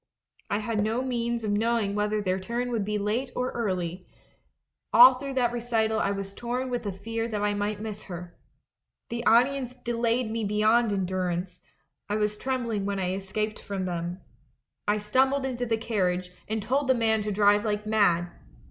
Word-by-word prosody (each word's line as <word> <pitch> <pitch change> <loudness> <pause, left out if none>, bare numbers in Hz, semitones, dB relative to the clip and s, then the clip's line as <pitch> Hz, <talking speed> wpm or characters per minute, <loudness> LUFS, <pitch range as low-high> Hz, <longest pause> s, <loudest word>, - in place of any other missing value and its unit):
I 205 - +1
had 215 0 -1
no 225 +4 0
means 235 -2 -1
of 210 - -1
knowing 220 -1 +1
whether 210 0 0
their 185 0 0
turn 240 +5 -3
would 225 -4 0
be 210 +1 -1
late 215 +6 -1
or 250 0 -1
early; 185 -5 -3 0.8
all 265 -5 +10
through 270 +1 -6
that 245 -2 +2
recital 225 -2 0
I - - +1
was 195 0 -4
torn 250 +3 -3
with 245 - -1
the 205 - -3
fear 225 +4 -3
that 210 -3 -2
I 205 0 +2
might 205 0 -2
miss 215 -1 -6
her. 175 -2 -8 0.7
The 235 0 -3
audience 250 +2 +3
delayed 235 -1 0
me 225 0 -2
beyond 215 +2 +3
endurance 180 -2 -2 0.2
— - - -49
I 205 - 0
was 210 0 0
trembling 235 -4 -2
when 200 -1 -1
I 185 -1 -1
escaped 210 +3 -3
from 195 -2 -3
them. 175 0 -3 0.7
I 210 +1 +3
stumbled 265 +6 +2
into 245 -2 -2
the 225 -1 +1
carriage, 185 -5 -1 0.2
and 220 -1 -2
told 270 +5 0
the 260 - +4
man 220 -2 +2
to 210 0 -2
drive 205 +1 +4
like 210 -1 -1
mad. 180 -5 +2
215 Hz, 185 wpm, -27 LUFS, 200-235 Hz, 0.8 s, all